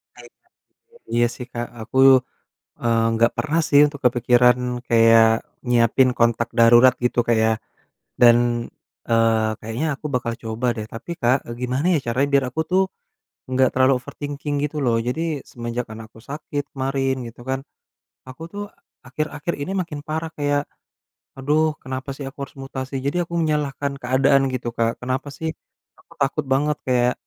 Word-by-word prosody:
Baik - - -14
Kak, - - -38 0.6
iya 120 0 +3
sih 125 - -8
Kak, 120 0 -3
aku, 110 +4 -3 0.8
eee, 115 -1 +2
nggak 115 +1 +3
pernah 155 +2 0
sih 145 - +6
untuk 145 -1 -7
kepikiran, 125 0 +4 0.3
kayak, 115 -1 +6 0.4
nyiapin 120 +2 +4
kontak 115 0 +2
darurat 120 +2 +7
gitu 125 - 0
Kak 120 - +3
ya. 110 - +3 0.7
Dan, 120 -1 +8 0.7
eee, 115 -1 +3
kayaknya 115 +8 -3
aku 150 - -7
bakal 120 -2 -1
coba 110 +2 -3
deh, 110 -1 -5
tapi 115 +9 -9
Kak, 120 +2 +4
eee, 115 - -6
gimana 130 +5 -1
ya - - +3
caranya 130 +4 +1
biar 140 -1 +4
aku 160 - -2
tuh 185 +1 +4 0.7
nggak 130 0 +3
terlalu 130 +1 +4
overthinking 145 +3 -5
gitu 150 +1 -4
loh? 120 -2 +2
Jadi, 125 +7 -1 0.3
semenjak 120 0 -4
anak 110 0 -9
aku 115 - -16
sakit 145 0 -4
kemarin, 135 0 -1
gitu 115 - -14
kan. 130 0 -1 0.7
Aku 130 +5 -10
tuh 205 0 -5 0.4
akhir-akhir 150 +4 -3
ini 145 - -3
makin 165 -5 -3
parah, 160 +1 -3
kayak, 145 -1 +1 0.8
aduh, 150 +3 +1
kenapa 130 +1 -6
sih 140 - -7
aku 135 - -15
harus 135 - -18
mutasi. 135 0 -6
Jadi 140 +4 -1
aku 170 - -8
menyalahkan 145 -3 -1
keadaan 135 +2 +3
gitu 125 -2 -3
Kak, 115 0 0
kenapa 130 +3 -3
sih, 160 +3 -4 0.5
aku - - -23
takut 140 +2 0
banget, 150 +2 +1
kayak, 125 -1 +2
130 Hz, 160 wpm, -22 LUFS, 120-145 Hz, 0.8 s, Dan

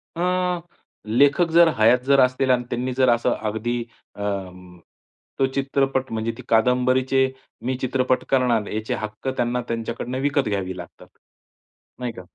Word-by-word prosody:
अ, 180 0 0 0.5
लेखक 140 +9 +3
जर 170 +1 +7
हयात 115 +3 +5
जर 140 0 +4
असतील 130 +1 +2
आणि 125 -1 +2
त्यांनी 125 +1 -2
जर 130 0 +3
असं 120 0 +2 0.2
अगदी, 120 +3 -2 0.3
अं, 90 -3 -5 0.6
तो 135 - +4
चित्रपट, 135 -1 0
म्हणजे 110 0 -2
ती - - -8
कादंबरीचे 130 +3 +2 0.3
मी 130 +1 0
चित्रपट 130 0 +1
करणार, 120 -5 +2
याचे 110 +1 -3
हक्क 110 +4 -7
त्यांना 120 +1 0
त्यांच्याकडून 115 +2 -4
विकत 140 0 0
घ्यावे 95 -2 -3
लागतात, - - -11 0.9
नाही 125 -1 -3
का? 95 - -9
125 Hz, 140 wpm, -23 LUFS, 110-135 Hz, 0.9 s, जर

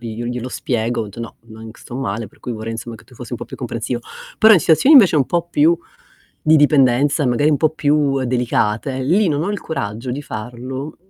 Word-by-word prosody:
io 115 -2 -7
io - - -4
glielo 125 +1 -4
spiego, 120 -1 -2
ho - - -5
detto: 105 +2 -10
"No, 115 - -8
nonc 110 0 -12
sto 120 - -11
male 115 -4 -3
per - - -22
cui - - -6
vorrei 110 0 -5
insomma 115 0 -7
che - - -18
tu - - -20
fossi - - -10
un - - -3
po' - - -6
più - - -10
comprensivo". 120 +1 -4 0.4
Però 220 0 +7
in 190 - +7
situazioni 260 - +5
invece 195 -10 +6
un 145 - +3
po' 170 -1 -1
più 315 - +3 0.7
di 155 +1 +5
dipendenza, 145 0 +3
magari 135 +5 +2
un 145 - +2
po' 155 +2 +2
più 145 -3 +1
delicate, 125 +1 -1
lì 180 +9 +2
non 150 +1 -1
ho 200 - -2
il 205 - -4
coraggio 115 -5 -5
di 130 +4 -4
farlo, 130 +6 -7
130 Hz, 225 wpm, -19 LUFS, 115-155 Hz, 0.7 s, Però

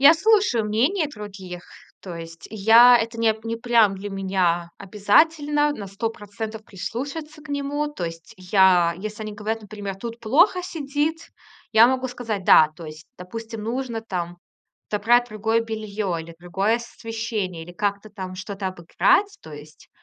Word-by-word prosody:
Я 285 +4 +9
слушаю 390 - +3
мнение 275 - +1
других, 195 -7 -9 0.4
то 180 -3 -8
есть 165 0 -9
я 225 +4 +7
это 230 0 -2
неп 220 -1 +1
не 230 0 -2
прям 230 -4 +3
для 205 +1 -6
меня 185 -3 0
обязательно 295 - +2
на 200 -7 -7
100 205 +4 -2
процентов 220 +1 -7
прислушаться 285 - -6
к 305 - -14
нему, 285 +1 -2
то 295 -12 -5
есть 165 0 -8
я 185 -2 +4
если 215 +2 -6
они 215 -1 -5
говорят, 215 +1 -4
например:"Тут 210 +2 -7
плохо 340 - +3
сидит". 310 0 -3 0.4
Я 225 +2 +7
могу 260 0 0
сказать: 225 -6 -4
"Да". 155 - +7
То 165 - -9
есть, 155 0 -11
допустим, 225 +4 -7
нужно, 235 0 -3
там, 175 -5 -5 0.5
забрать 240 +4 +3
другое 220 +1 0
белье 215 -4 -3
или 165 +1 -10
другое 195 +6 0
освещение, 220 -7 -5
или 175 - -11
как-то 200 +2 -2
там 185 -3 -7
что-то 195 0 -4
обыграть 185 - +1
то 155 - -11
есть 150 +1 -13
215 Hz, 155 wpm, -23 LUFS, 190-245 Hz, 0.5 s, Я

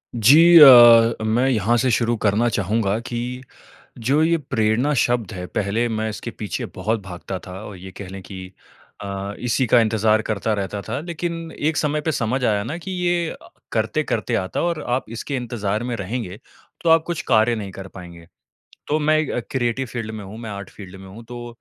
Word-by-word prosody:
जी 160 +10 +7
अ, 120 -5 +8
मैं 115 +4 +1
यहाँ 115 -2 +1
से 130 +2 +1
शुरू 120 +1 +1
करना 105 +3 +2
चाहूँगा 105 0 0
कि 120 +1 -5 0.6
जो 135 +7 +1
ये 170 +1 +3
प्रेरणा 125 0 0
शब्द 120 -5 0
है, 90 -1 -6
पहले 105 +6 -1
मैं 110 -1 -2
इसके 115 +2 -6
पीछे 105 -5 -5
बहुत 110 +1 -1
भागता 95 0 -7
था 90 - -9
और 100 - -9
ये 95 +1 -10
कह 100 - -8
लें 95 +1 -8
कि 95 -1 -10 0.5
अ, 100 0 -5
इसी 125 +2 0
का 120 +1 +5
इंतज़ार 110 -1 +2
करता 110 0 -2
रहता 100 0 -4
था। 115 - -2
लेकिन 170 0 -5
एक 155 +1 0
समय 150 0 0
पे 160 +1 -2
समझ 125 +1 -1
आया 105 -3 +1
ना, 160 - -4
कि 185 +2 -8
ये 175 -2 0
अ, - - -12 0.2
करते-करते - - -1
आता 95 0 -2
है - - 0
और 170 -3 -2
आप 125 +2 0
इसके 140 +4 -4
इंतज़ार 110 -4 -3
में 125 - -3
रहेंगे, 100 -1 -5 0.5
तो 165 - +3
आप 160 0 +6
कुछ 170 -2 -3
कार्य 115 0 +4
नहीं 100 -3 -6
कर 95 +1 -9
पाएँगे। 85 -2 -11 0.6
तो 150 - +1
मैं 155 0 +2
अ, - - -1
क्रिएटिव 130 0 -1
फील्ड 115 -2 -5
में 110 -2 -7
हूँ, 105 +4 -10
मैं 115 -2 -7
आर्ट 100 -1 -7
फील्ड 95 -2 -12
में 95 - -12
हूँ। 110 +5 -12
तो 120 +1 -8
115 Hz, 200 wpm, -21 LUFS, 100-130 Hz, 0.6 s, अ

